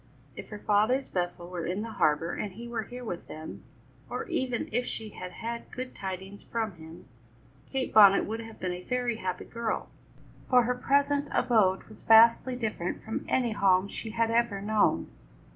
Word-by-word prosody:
If -, -, -9 dB
her 210 Hz, -, -6 dB
father's 215 Hz, +6 st, +2 dB
vessel 175 Hz, -1 st, -3 dB
were 175 Hz, -2 st, -4 dB
in 190 Hz, +4 st, -2 dB
the 230 Hz, -, -6 dB
harbour 155 Hz, -3 st, +1 dB
and 205 Hz, -3 st, -4 dB
he 235 Hz, +4 st, -8 dB
were 235 Hz, -2 st, -2 dB
here 245 Hz, +4 st, -8 dB
with 180 Hz, -7 st, -6 dB
them, 155 Hz, 0 st, -8 dB, 0.5 s
or 455 Hz, -, -4 dB
even 260 Hz, -8 st, -1 dB
if 245 Hz, +2 st, 0 dB
she 220 Hz, -1 st, -5 dB
had 180 Hz, -3 st, -8 dB
had 235 Hz, +4 st, -6 dB
good 255 Hz, 0 st, -6 dB
tidings 190 Hz, +1 st, -6 dB
from 225 Hz, -2 st, -3 dB
him, 160 Hz, +2 st, -12 dB, 0.7 s
Kate 265 Hz, -1 st, -2 dB
Bonnet 200 Hz, -2 st, +8 dB
would 220 Hz, +2 st, -4 dB
have 225 Hz, -1 st, -10 dB
been 185 Hz, -, -2 dB
a 180 Hz, -, -6 dB
very 245 Hz, +2 st, -1 dB
happy 185 Hz, -4 st, -4 dB
girl, 230 Hz, -1 st, -3 dB, 0.6 s
for 250 Hz, -1 st, +6 dB
her 250 Hz, +2 st, +1 dB
present 285 Hz, +3 st, +1 dB
abode 215 Hz, -7 st, +3 dB
was 215 Hz, -, -15 dB
vastly 230 Hz, +3 st, +6 dB
different 215 Hz, -7 st, -3 dB
from 220 Hz, -, -4 dB
any 245 Hz, -3 st, +2 dB
home 195 Hz, -2 st, +3 dB
she 220 Hz, -, -6 dB
had 230 Hz, 0 st, 0 dB
ever 230 Hz, -4 st, +1 dB
known. 210 Hz, +1 st, +2 dB
220 Hz, 180 wpm, -29 LUFS, 190-240 Hz, 0.7 s, Bonnet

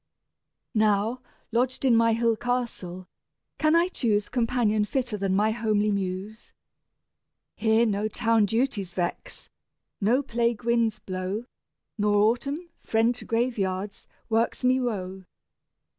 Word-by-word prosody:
Now, 215 Hz, +2 st, +2 dB, 0.3 s
lodged 250 Hz, +3 st, 0 dB
in 245 Hz, -3 st, +5 dB
my 230 Hz, 0 st, +4 dB
hill 230 Hz, 0 st, +2 dB
castle, 220 Hz, -7 st, -3 dB, 0.5 s
can 310 Hz, +1 st, +3 dB
I 340 Hz, +1 st, +4 dB
choose 215 Hz, -, 0 dB
Companion 230 Hz, -3 st, +1 dB
fitter 245 Hz, 0 st, -2 dB
than 195 Hz, -2 st, 0 dB
my 210 Hz, +2 st, +3 dB
homely 215 Hz, -2 st, +1 dB
Muse? 200 Hz, +3 st, -4 dB, 1.0 s
Here 220 Hz, +1 st, +3 dB
no 210 Hz, -1 st, 0 dB
town 225 Hz, -1 st, +2 dB
duties 225 Hz, -6 st, -1 dB
vex, 175 Hz, -2 st, -4 dB, 0.5 s
no 240 Hz, +8 st, +3 dB
plague 235 Hz, -2 st, -1 dB
winds 235 Hz, -2 st, +1 dB
blow, 190 Hz, +2 st, -4 dB, 0.5 s
Nor 205 Hz, 0 st, +2 dB
Autumn, 275 Hz, +11 st, +1 dB
friend 225 Hz, +2 st, +2 dB
to 245 Hz, -, -9 dB
graveyards, 205 Hz, -5 st, -2 dB, 0.2 s
works 230 Hz, +2 st, 0 dB
me 255 Hz, +1 st, +4 dB
woe. 190 Hz, -6 st, -3 dB
225 Hz, 120 wpm, -26 LUFS, 205-240 Hz, 1.0 s, in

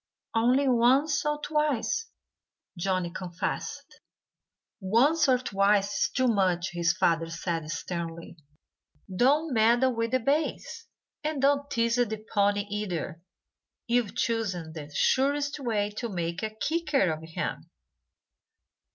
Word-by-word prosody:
"Only 250 Hz, +5 st, +3 dB
once 265 Hz, +4 st, +3 dB
or 295 Hz, 0 st, 0 dB
twice!" 300 Hz, -, 0 dB, 0.7 s
Johnnie 185 Hz, -1 st, -1 dB
confessed. 175 Hz, 0 st, -5 dB, 0.8 s
"Once 265 Hz, +10 st, +3 dB
or 255 Hz, -, +5 dB
twice 200 Hz, -3 st, +1 dB
is -, -, -2 dB
too 255 Hz, -1 st, +1 dB
much," 190 Hz, -5 st, +1 dB
his 175 Hz, 0 st, +1 dB
father 165 Hz, -2 st, +1 dB
said 165 Hz, -1 st, -3 dB
sternly. 170 Hz, 0 st, -5 dB, 0.8 s
"Don't 285 Hz, -, +3 dB
meddle 240 Hz, +3 st, +3 dB
with 230 Hz, 0 st, -1 dB
the 255 Hz, +2 st, +1 dB
bays. 285 Hz, +6 st, -2 dB, 0.4 s
And 305 Hz, -1 st, -2 dB
don't 280 Hz, +1 st, +2 dB
tease 230 Hz, +1 st, +1 dB
the 220 Hz, -3 st, -1 dB
pony, 205 Hz, 0 st, +3 dB
either. 180 Hz, -6 st, -3 dB, 0.6 s
You've 235 Hz, -3 st, 0 dB
chosen 190 Hz, -9 st, -2 dB
the 150 Hz, -2 st, -8 dB
surest 285 Hz, -, +1 dB
way 215 Hz, -6 st, -1 dB
to 235 Hz, -, -3 dB
make 170 Hz, -2 st, -3 dB
a 220 Hz, -, -2 dB
kicker 285 Hz, -, 0 dB
of 155 Hz, -, -4 dB
him. 160 Hz, 0 st, -5 dB
225 Hz, 120 wpm, -28 LUFS, 180-265 Hz, 0.8 s, or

